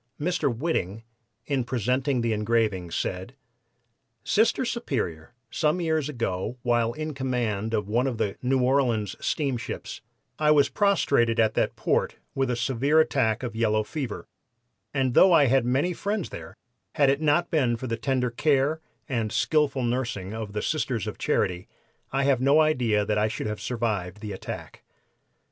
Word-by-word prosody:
Mr. 175 -2 0
Whiting, 115 - -2 0.4
in 135 -3 0
presenting 125 +2 0
the 115 -1 0
engraving, 105 -4 0
said: 95 +8 -4 0.9
"'Sister 230 +4 +2
Superior, 115 - -3 0.2
some 155 +3 +1
years 160 -4 0
ago, 115 -3 -3
while 120 -1 +1
in 155 +3 -4
command 120 -6 -2
of 105 -2 -2
one 120 +5 +1
of 125 -4 -2
the 105 -3 -1
New 130 0 +1
Orleans 125 -6 +1
steamships, 135 -6 -3 0.4
I 150 -1 +3
was 150 -2 +5
prostrated 140 - +2
at 110 -1 +3
that - - 0
port - - 0 0.2
with 135 -1 0
a 125 - 0
severe 135 +5 +2
attack 130 -7 +1
of 120 -3 -4
yellow 110 -1 +1
fever, 130 -1 -5 0.7
and 130 -2 0
though 185 +6 +6
I 150 -4 +6
had 130 -1 +3
many 140 +8 +1
friends 200 +2 -3
there, - - -9 0.4
had 140 -2 +4
it 140 +2 -1
not 155 +3 +2
been 125 -7 +2
for 130 - -6
the 115 -2 -1
tender 125 +1 -1
care 145 +4 +1 0.3
and 115 -6 -1
skillful 135 +2 +1
nursing 115 -5 -2
of 110 -2 -5
the 105 - -2
Sisters 130 - -1
of - - -6
Charity, 90 0 0 0.4
I 135 +1 +1
have 135 -2 +2
no 140 +4 +5
idea 125 -9 +2
that 105 0 0
I 105 - +2
should 110 - -4
have 105 0 -4
survived 105 -6 -2
the 105 -1 -6
attack. 95 - -7
125 Hz, 160 wpm, -26 LUFS, 110-145 Hz, 0.9 s, though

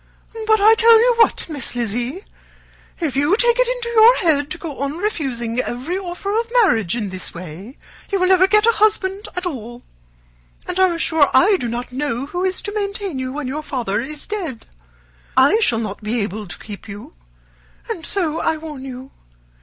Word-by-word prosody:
But 435 0 +4
I 430 +2 +7
tell 455 0 +6
you 485 +2 +4
what, 455 - +3
Miss 285 -7 -2
Lizzy, 245 - -2 0.8
if 315 -7 -2
you 290 +9 +2
take 480 0 +3
it - - +4
into - - -2
your 470 +1 +6
head 295 -5 +1
to 355 - -4
go 320 -5 -7
on 280 +3 -3
refusing 260 - -2
every 255 +8 -3
offer 390 +2 -4
of 460 +1 -1
marriage 225 - +1
in 210 -4 -3
this 185 -1 -6
way, 185 - -9 0.3
you 395 - 0
will 365 - +2
never 375 0 +5
get 425 +2 +4
a 465 - +6
husband 415 -2 +1
at 360 +1 -3
all 240 -6 -6 0.8
and 370 - -3
I 375 - +6
am 340 - -2
sure 320 -3 +3
I 400 +3 +5
do 245 - -3
not 240 +2 -5
know 270 -1 -2
who 355 +5 -4
is 375 0 -1
to 410 - -4
maintain 400 -7 -3
you 255 0 -3
when 290 +1 -5
your 290 +4 -3
father 235 -8 -2
is 295 +4 -3
dead. 350 - -5 0.7
I 280 +12 +5
shall 240 - +3
not 215 -2 -4
be 220 +3 -2
able 205 +1 -4
to - - -6
keep 210 0 -10
you 205 0 -10 0.7
and 330 - -5
so 330 -5 -1
I 320 - 0
warn 305 -4 -8
you. 260 0 -9
305 Hz, 195 wpm, -20 LUFS, 245-400 Hz, 0.8 s, I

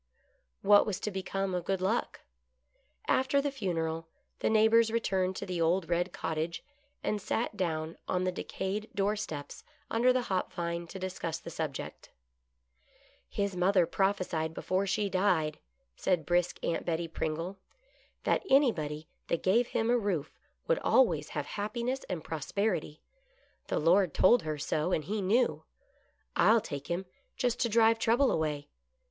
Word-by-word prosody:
What 205 +1 +6
was 205 - -2
to 210 - -2
become 190 0 -2
of 180 -1 -2
Good 195 -1 0
Luck? 195 +6 -1 0.9
After 265 +2 +3
the 285 0 0
funeral 165 -9 -2 0.3
the - - +1
neighbors 220 +1 +5
returned 190 -5 0
to - - -4
the 180 -3 -3
old 170 +1 +2
red 175 +1 +1
cottage, 160 +1 -3 0.4
and 210 -1 -1
sat 225 +2 -1
down 160 -4 -2
on 180 0 0
the 185 - +1
decayed 195 +3 -4
door 205 +1 +1
steps 150 -8 -6 0.3
under 240 +3 +4
the 255 0 +1
hop 190 -5 -1
vine 170 0 -3
to 190 - -8
discuss 185 -3 -3
the 170 - -9
subject. 155 -4 -5 0.6
" 65 +3 -34
His 200 -2 0
mother 180 0 +4
propliesied 175 -4 0
before 190 +2 0
she 200 +2 +1
died," 185 -6 +1 0.4
said 175 -5 0
brisk 175 +1 +1
Aunt 165 - -1
Betty 170 0 -1
Pringle, 165 +4 -3 0.3
" - - -35
that - - +2
anybody 155 - +2 0.2
that 170 - -1
gave 230 +6 +3
him 225 +1 0
a 245 - +4
roof 180 -8 -2 0.3
would - - +2
always 180 - +3
have 145 - -1
happiness 235 +6 -3
and 175 -4 -3
prosperity. 160 0 -2 0.6
The - - -1
Lord 175 +1 +3
told 240 +5 +6
her 155 -1 -3
so, 155 +4 -1
and 155 - +1
he 205 +7 -2
knew. 230 +6 +2 0.7
I'll 230 +1 +5
take 140 -10 -6
him, 175 +2 -2 0.3
just 245 -2 0
to 235 - +1
drive 225 0 +4
trouble 240 +5 +3
away. 150 -2 -1
185 Hz, 155 wpm, -31 LUFS, 165-215 Hz, 0.9 s, What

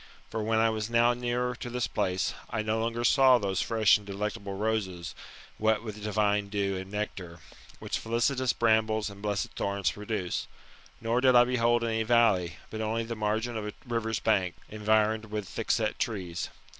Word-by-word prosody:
For 110 - -2
when 110 +1 +1
I 110 0 +4
was 110 0 -3
now 120 +1 +4
near 125 0 -1
to 120 - -6
this 125 0 -1
place, 95 +1 -1 0.2
I 110 -1 -2
no 110 +1 0
longer 115 +1 -1
saw 130 0 +6
those 95 -4 -1
fresh 110 -3 +4
and 105 - -15
delectable 100 0 -4
roses, 95 -5 -2 0.5
wet 110 0 +2
with 105 -2 -7
divine 105 -1 +1
dew 100 -1 -1
and 95 0 -6
nectar, 95 -5 -4 0.4
which - - -3
felicitous 120 +2 +1
brambles 110 -2 +2
and 100 0 -12
blessed 105 -1 -2
thorns 100 -3 -1
produce; 105 -3 -3 0.5
nor 115 +2 0
did 130 -1 +5
I 120 - +9
behold 120 -1 +2
any 110 -1 0
valley, 110 -7 +3 0.2
but 110 - -4
only 110 +1 -1
the 115 +1 -5
margin 110 +2 -1
of 105 -1 -3
a 105 - -5
river's 115 -2 -1
bank, 90 -3 +1
environed 110 +1 +1
with 105 -2 -4
thickset 110 -1 -1
trees. 90 -7 -3
110 Hz, 175 wpm, -29 LUFS, 100-115 Hz, 0.5 s, I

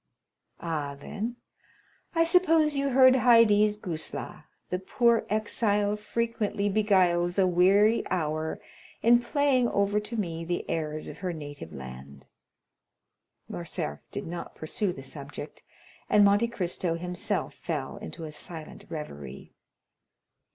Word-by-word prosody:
"Ah, 150 -4 -3
then, 220 +10 -5 0.8
I 330 - +5
suppose 330 -3 +4
you 275 0 +1
heard 260 0 +7
Haydée's 225 -4 +5
guzla; 165 -6 -6 0.3
the 180 - 0
poor 235 +4 +2
exile 210 -1 +1
frequently 210 -1 -1
beguiles 185 -4 +2
a 190 - +5
weary 195 +5 +4
hour 155 -3 -1 0.4
in 240 +1 +6
playing 260 -2 +2
over 200 +1 +1
to 210 +2 -6
me 165 -5 -3
the 175 +1 -3
airs 155 -1 -3
of - - -9
her 185 -1 -2
native 145 - -8
land." 65 +1 -10 1.2
Morcerf 75 0 -4
did - - -5
not 170 +1 -6
pursue 180 +5 -2
the 135 - -9
subject, 140 +1 -9 0.5
and 205 -1 +6
Monte 205 +3 +4
Cristo 180 -5 -2
himself 180 +4 -2
fell 160 +2 -4
into 200 -5 -8
a 155 - -6
silent 155 +1 -7
reverie. 70 - -8
190 Hz, 125 wpm, -28 LUFS, 160-225 Hz, 1.2 s, heard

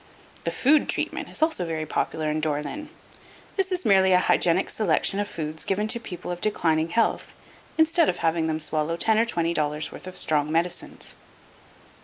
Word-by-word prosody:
The - - +1
"Food 295 +3 +3
Treatment" - - -1
is - - 0
also 315 - +1
very 160 -2 -3
popular 155 0 -2
in 155 - -1
Dore 150 -1 0
lyn. 300 - -7 0.7
This 385 -1 0
is 365 0 -1
merely 190 -1 +5
a - - +7
hygienic 180 0 +2
selection 195 0 +1
of 205 - -1
foods 155 -3 -4
given 205 +2 -1
to 235 - +1
people 180 -5 -7
of 175 0 -5
declining 165 -6 +1
health, 225 +5 0 0.4
instead 320 0 +4
of 175 - -1
having 165 -1 0
them 155 0 -1
swallow 155 +1 -1
ten 220 +4 +3
or 230 - +3
twenty 170 -7 -1
dollars' 150 -1 -1
worth - - -10
of 185 - -7
strong 150 -1 0
medicines. 170 +2 -1
175 Hz, 185 wpm, -25 LUFS, 155-215 Hz, 0.7 s, a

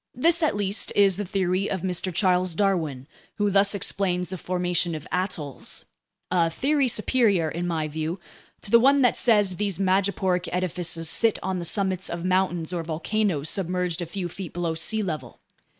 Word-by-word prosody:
This, 330 +7 +3
at 310 - +2
least, 200 0 0
is 195 -2 +4
the 205 - -3
theory 190 +1 0
of 190 -2 -3
Mr. 185 0 -1
Charles 180 -1 +2
Darwin, 160 -10 0 0.3
who 205 -1 0
thus 200 +1 +4
explains 180 -2 -1
the 185 - -4
formation 180 -1 -1
of 155 - -7
atolls—a 165 - -3
theory 275 - +1
superior, 215 -7 +2
in 175 +2 -3
my 160 -3 -1
view, 160 +4 -4 0.4
to 200 - -6
the 235 - +8
one 275 +3 +4
that 245 - +4
says 205 -6 +3
these 200 -3 -1
madreporic 190 -1 +1
edifices 175 -2 -1
sit 225 +6 +3
on 190 -1 -2
the 170 - -3
summits 190 0 0
of 170 +1 -4
mountains 185 -2 0
or 175 - -1
volcanoes 165 0 -1
submerged 180 -2 -1
a 170 - -4
few 180 +1 -4
feet 180 +1 -8
below 170 -2 -2
sea 215 +7 -1
level. 160 -6 -5
185 Hz, 170 wpm, -25 LUFS, 170-200 Hz, 0.4 s, the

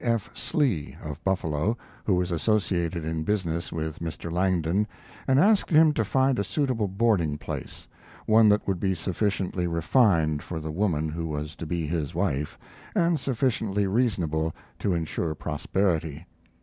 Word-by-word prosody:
D. - - -5
F. 115 -3 0
Slee, 120 - -1
of 75 -2 -7
Buffalo, 95 +2 0 0.3
who 95 - +3
was 90 0 0
associated 85 -3 0
in 80 0 -2
business 85 -3 -1
with 80 -1 -4
Mr. 85 0 -5
Langdon, 90 +2 +1 0.4
and 130 0 +4
asked 205 +5 +4
him 155 -1 +6
to 115 - +1
find 130 +3 +2
a - - +2
suitable 115 +1 0
boarding 95 -7 +1
place, - - -7 0.4
one 110 0 +6
that 105 0 +2
would 95 -3 0
be 95 0 +1
sufficiently 95 0 -1
refined 85 - +2
for 85 +1 -5
the 80 0 -5
woman 80 -4 0
who 80 +1 -3
was 75 -1 -4
to 80 - -6
be 85 0 -1
his 75 -2 -2
wife, 75 +3 -1 0.4
and 170 -4 +3
sufficiently 115 -6 0
reasonable 90 -8 0 0.2
to 95 -3 +1
insure 80 -1 -2
prosperity. 80 -4 -1
90 Hz, 155 wpm, -26 LUFS, 80-110 Hz, 0.4 s, him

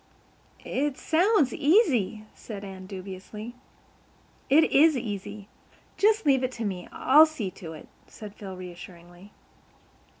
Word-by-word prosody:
"It 285 0 -2
sounds 335 - +2
easy," 265 - +2
said 205 -3 -9
Anne 190 -1 -9
dubiously. 195 +4 -8 1.0
"It 300 +4 +6
is 305 +1 +5
easy. 205 -3 -6 0.5
Just 430 -1 +2
leave 265 -3 +3
it 255 - -1
to 230 -2 -5
me. 185 -3 -4
I'll 300 +5 +6
see 235 -12 -5
to 165 -3 -7
it," 155 - -12 0.2
said 210 -2 -11
Phil 195 -3 -9
reassuringly. 175 +1 -12
215 Hz, 125 wpm, -26 LUFS, 190-290 Hz, 1.0 s, It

